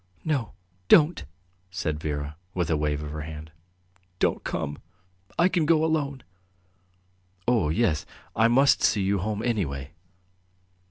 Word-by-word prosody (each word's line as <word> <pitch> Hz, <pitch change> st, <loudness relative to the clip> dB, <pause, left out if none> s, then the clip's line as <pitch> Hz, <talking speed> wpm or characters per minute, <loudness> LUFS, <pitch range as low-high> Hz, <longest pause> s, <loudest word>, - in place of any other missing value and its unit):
"No, 140 Hz, -9 st, -1 dB, 0.3 s
don't!" 155 Hz, -, +5 dB, 0.4 s
said 85 Hz, -4 st, -3 dB
Vera, 75 Hz, -1 st, -4 dB, 0.2 s
with 85 Hz, -3 st, 0 dB
a -, -, +3 dB
wave 75 Hz, 0 st, -1 dB
of 75 Hz, -, -6 dB
her 75 Hz, 0 st, -5 dB
hand. 75 Hz, 0 st, -8 dB, 0.7 s
"Don't -, -, +1 dB
come; 75 Hz, 0 st, -3 dB, 0.6 s
I 170 Hz, -, +5 dB
can 170 Hz, -5 st, +1 dB
go 160 Hz, -1 st, +4 dB
alone." 145 Hz, -4 st, -1 dB, 1.2 s
"Oh, 115 Hz, -11 st, +3 dB
yes... 80 Hz, -2 st, +1 dB, 0.3 s
I 110 Hz, +1 st, +5 dB
must 135 Hz, +4 st, +4 dB
see 105 Hz, -4 st, +3 dB
you 100 Hz, +1 st, +1 dB
home 105 Hz, +3 st, -2 dB
anyway." 70 Hz, -, -2 dB
95 Hz, 130 wpm, -26 LUFS, -, 1.2 s, don't